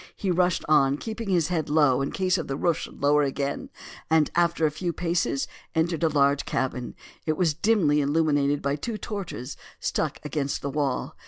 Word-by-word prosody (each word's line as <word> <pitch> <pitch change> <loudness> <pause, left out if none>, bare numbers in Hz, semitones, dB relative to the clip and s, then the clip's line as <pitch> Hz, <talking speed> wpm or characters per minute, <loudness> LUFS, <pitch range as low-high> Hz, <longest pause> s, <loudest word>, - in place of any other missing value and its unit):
He 195 - -1
rushed 180 0 +1
on, 140 -2 +4
keeping 220 +3 -5
his 175 -4 +2
head 160 -4 -1
low 145 -4 +4
in 135 - -2
case 185 0 +1
the 135 -5 -3
roof 170 0 +1
should - - -8
lower 145 +1 +4
again, 140 0 -2 0.4
and 160 -2 +3
after 170 -2 +2
a 150 - +2
few 170 +3 -2
paces 170 -5 0 0.3
entered 160 0 +1
a 165 - +3
large 140 -1 +3
cabin. 125 -2 -3 0.3
It 155 -1 +1
was 170 -4 +2
dimly 160 -5 +2
illuminated 145 -1 +1
by 140 +1 0
two 225 +7 -4
torches 195 - -6 0.2
stuck - - -1
against 145 -1 -2
the 140 - -2
wall. 140 -2 -2
155 Hz, 180 wpm, -26 LUFS, 140-175 Hz, 0.4 s, on